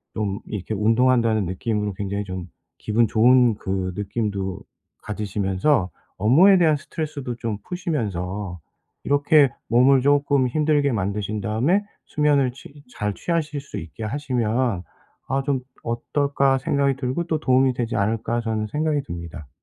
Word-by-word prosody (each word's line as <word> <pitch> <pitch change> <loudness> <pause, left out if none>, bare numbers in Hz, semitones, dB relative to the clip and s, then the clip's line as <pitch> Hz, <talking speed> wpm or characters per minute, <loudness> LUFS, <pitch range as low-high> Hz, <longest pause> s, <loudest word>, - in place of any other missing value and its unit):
좀 100 -2 -2
이렇게 105 +1 -4
운동한다는 115 0 +3
느낌으로 105 +2 -2
굉장히 100 +1 -3
좀 95 -2 -6 0.3
기분 110 +2 +1
좋은 120 +1 +4
그 95 -2 -3
느낌도 100 -2 -3 0.4
가지시면서 100 +2 0 0.3
업무에 170 - +6
대한 160 -3 +4
스트레스도 145 -4 -5
좀 115 -3 -3
푸시면서 100 - -3 0.5
이렇게 145 0 +4 0.2
몸을 130 +3 +5
쪼끔 140 -1 +3
힘들게 150 +1 +2
만드신 105 0 -2
다음에 120 - +1 0.2
수면을 145 -4 +2
취 140 +3 -14
잘 105 -1 -2
취하실 155 -4 -2
수 140 - -7
있게 80 +7 -9
하시면 120 -4 -1 0.5
'아 135 +1 0
좀 140 -3 0 0.2
어떨까?' 135 +3 0
생각이 140 +1 +1
들고 135 +5 -2
또 160 -2 -1
'도움이 130 -2 +3
되지 120 -2 -3
않을까?' 115 +3 0
저는 110 -2 -2
생각이 150 +3 0
듭니다. 85 - -8
120 Hz, 310 characters per minute, -23 LUFS, 105-140 Hz, 0.5 s, 업무에